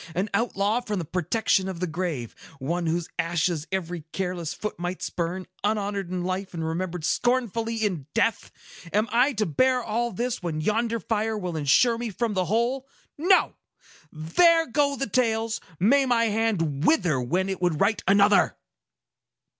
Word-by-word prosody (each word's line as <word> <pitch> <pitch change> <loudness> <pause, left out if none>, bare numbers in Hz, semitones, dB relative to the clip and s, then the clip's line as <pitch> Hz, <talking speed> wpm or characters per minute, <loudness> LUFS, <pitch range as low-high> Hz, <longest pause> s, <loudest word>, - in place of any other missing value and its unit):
An 195 +4 -1
outlaw 215 +1 +1
from 210 -4 -3
the 170 - -3
protection 185 +3 0
of 185 -3 -6
the 180 - 0
grave,—one 165 0 -4
whose 165 +1 -1
ashes 165 -1 0
every 175 -3 -3
careless 180 -4 -3
foot 210 -2 -5
might 175 +1 -4
spurn, 180 +2 -3 0.2
unhonored 205 -3 -1
in 180 -1 -3
life, 185 +1 -3
and 165 -1 -3
remembered 170 0 -3
scornfully 230 -1 0
in 190 -11 -2
death! 230 -1 +1 0.4
Am 210 +2 +2
I 250 +5 +3
to 215 -2 0
bear 255 - +2
all 235 +2 -1
this, 240 +4 -2
when 165 -3 -3
yonder 225 +6 0
fire 220 0 -1
will 180 -4 -4
insure 195 - +3
me 240 -1 -3
from 220 +2 -2
the 185 -2 0
whole? 240 +7 0 0.3
No! 365 +5 +3 0.6
There 330 - +3
go 280 +2 +1
the 275 - -2
tales! 225 -1 0 0.2
May 265 +8 +4
my 240 -2 +3
hand 190 -10 0
wither 180 - +3
when 180 +10 0
it 190 -1 -4
would 175 -4 +1
write 205 +2 +1
another!" 200 +1 +4
200 Hz, 160 wpm, -25 LUFS, 175-230 Hz, 0.6 s, May